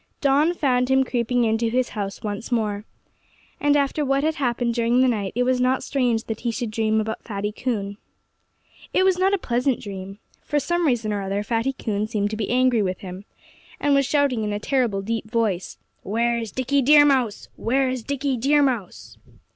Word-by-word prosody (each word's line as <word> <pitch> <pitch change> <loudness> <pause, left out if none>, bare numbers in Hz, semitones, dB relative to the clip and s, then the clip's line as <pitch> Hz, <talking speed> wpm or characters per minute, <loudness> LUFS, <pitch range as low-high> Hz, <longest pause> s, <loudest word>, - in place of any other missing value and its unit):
Dawn 290 +5 +3
found 250 -5 +1
him 265 0 +4
creeping 245 -1 0
into 225 0 +1
his 250 +1 0
house 200 -2 -5
once 210 +3 -5
more. 210 -3 -1 0.7
And 290 0 +3
after 285 +1 0
what 275 0 +1
had 315 +1 +1
happened 240 -4 -1
during 235 +1 +2
the 260 - +4
night 210 -6 -1
it 250 - +2
was 255 0 +1
not 255 +1 +1
strange 245 -5 0
that 220 -1 -5
he 240 - -2
should 230 0 -3
dream 220 0 +1
about 220 0 -3
Fatty 205 -1 -3
Coon. 205 -4 -3 1.0
It 370 - +4
was 375 -1 +3
not 380 +1 +3
a - - -1
pleasant 250 -4 0
dream. 195 -1 -8 0.2
For 295 - -1
some 345 +2 0
reason 230 -5 0
or 205 - -2
other 195 +1 -2
Fatty 230 +5 -1
Coon 215 -4 -2
seemed 210 -2 -1
to - - -2
be 215 -2 -3
angry 250 -2 +3
with 185 -2 -2
him, 185 +1 -8 0.5
and 290 -1 +2
was 275 -1 +3
shouting 280 -7 +1
in 210 - -2
a - - -1
terrible, 235 -6 0
deep 225 +1 -3
voice, 215 -6 -1 0.2
"Where's 230 +1 -1
Dickie 265 +2 0
Deer 290 +2 +7
Mouse? 255 -7 +1
Where's 255 +1 0
Dickie 275 +1 -2
Deer 285 +5 +3
Mouse?" 240 -9 -3
240 Hz, 195 wpm, -23 LUFS, 215-270 Hz, 1.0 s, Deer